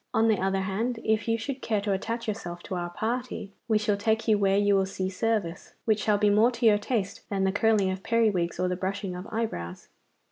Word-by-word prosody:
On 225 0 +4
the 215 - +2
other 195 0 +1
hand, 225 +5 -2
if 220 0 +1
you 230 0 +2
should 265 +4 -5
care 215 -2 0
to 205 0 -1
attach 230 +4 -2
yourself 175 -5 -5
to - - -6
our 175 -1 -2
party, 230 +2 -3 0.2
we 220 -2 +3
shall 210 -1 +1
take 220 +2 0
you 215 - +5
where 195 -1 +2
you 205 0 +3
will 190 -1 +2
see 190 -1 -3
service 200 -4 -2
which 215 -1 +2
shall 210 -1 +2
be 205 0 +3
more 215 +4 +5
to 235 0 -2
your 210 -2 +6
taste 210 -2 -2
than 195 -1 0
the 190 - +2
curling 205 -2 +2
of 185 0 -5
periwigs 205 -7 +1
or 180 - +1
the 180 - -1
brushing 190 0 -3
of 180 +2 -7
eyebrows. 95 - -4
205 Hz, 235 wpm, -27 LUFS, 190-225 Hz, 0.2 s, your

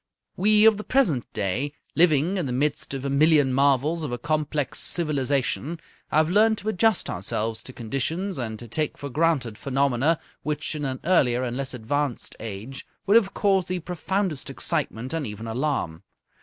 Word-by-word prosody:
We 210 +2 +4
of 220 -2 +6
the 210 - -5
present 185 - +1
day, 110 +8 -2 0.2
living 165 +2 +3
in 175 -6 -1
the - - -3
midst 140 +2 -1
of 135 0 -5
a - - -1
million 145 -2 +4
marvels 140 +4 +2
of 150 -5 -4
a 120 - -2
complex 150 +1 -1
civilization, 145 0 +1 0.3
have 155 +1 +2
learned 215 +5 +4
to 210 - -3
adjust 220 0 +2
ourselves 110 +4 -2
to - - -9
conditions 140 - -3
and 110 -3 -4
to 120 - -9
take 150 +6 -2
for 140 - -6
granted 145 -8 0
phenomena 140 +3 +1 0.2
which 150 +1 -2
in 150 -2 -3
an 130 -1 -3
earlier 130 -8 +3
and 120 -1 -3
less 135 0 -4
advanced 125 +3 -2
age 115 +5 -6 0.2
would 200 - +3
have 205 -4 +4
caused 195 -3 +2
the 185 - -1
profoundest 180 -2 -2
excitement 125 +6 -1
and 160 -5 -2
even 105 +2 -7
alarm. 115 - -2
145 Hz, 170 wpm, -25 LUFS, 125-170 Hz, 0.3 s, of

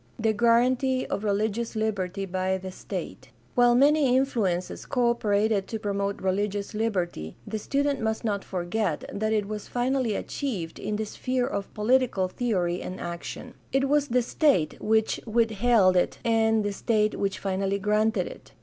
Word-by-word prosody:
The 220 0 +1
guaranty 250 +4 +3
of 200 - -3
religious 215 +3 -1
liberty 195 -3 -1
by 185 0 -1
the 190 0 -7
state. - - -7
— - - -33
While 245 -1 +5
many 280 -1 +4
influences 200 -10 -1
co 245 -2 +2
operated 210 -3 +1
to 225 - -3
promote 200 -1 -2
religious 200 +2 -1
liberty, 180 - -2
the 215 0 -4
student 280 +4 0
must 220 +1 -1
not 205 -3 -1
forget 180 -1 -2
that 215 +2 -1
it 210 -2 +1
was 210 -1 -5
finally 245 -2 0
achieved 195 - -4
in 210 +1 -2
the 215 +1 -2
sphere 255 +4 -1
of 200 -7 -4
political 220 -3 +2
theory 180 -5 -1
and 185 - -6
action. 175 +8 -6 0.2
It 270 +1 +2
was 290 0 +2
the 250 -1 +2
state 245 - +1
which 220 0 +2
withheld 225 -3 +3
it 180 - +1
and 225 -1 +3
the 205 - -1
state 215 +1 +1
which 195 -1 -1
finally 195 0 -1
granted 210 -1 +1
it. - - -11
215 Hz, 160 wpm, -26 LUFS, 195-240 Hz, 0.2 s, While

